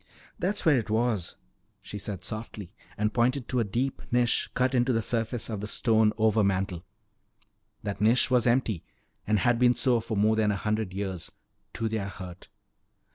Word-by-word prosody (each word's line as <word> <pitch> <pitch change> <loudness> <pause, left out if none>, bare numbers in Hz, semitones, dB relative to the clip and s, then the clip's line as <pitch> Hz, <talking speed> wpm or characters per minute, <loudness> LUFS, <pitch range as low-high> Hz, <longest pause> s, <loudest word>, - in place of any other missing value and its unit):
"There's 200 +3 -1
where 150 -6 +5
it 115 - -6
was," 110 -4 0 0.4
she 105 - -8
said 95 -2 -5
softly 105 -3 -6 0.2
and 105 0 0
pointed 125 +2 +1
to 125 - +1
a - - +3
deep 120 +6 -2
niche 120 -1 +2
cut 130 +1 +2
into 125 0 +3
the 115 -2 +1
surface 115 0 -1
of 110 -3 -4
the 105 - -4
stone 110 -1 +3
overmantel. 100 -5 +1 1.0
That 100 -1 -4
niche 115 +5 +3
was 125 -2 +3
empty 120 -7 +1 0.4
and 105 0 +3
had 120 +2 +2
been 125 -1 +5
so 125 -3 +2
for 110 -1 -4
more 110 +2 +3
than 110 -1 +2
a - - 0
hundred 105 -1 -1
years 95 -2 -4 0.4
to 115 - -2
their 110 -3 -2
hurt. 90 -3 -9
110 Hz, 175 wpm, -28 LUFS, 105-120 Hz, 1.0 s, where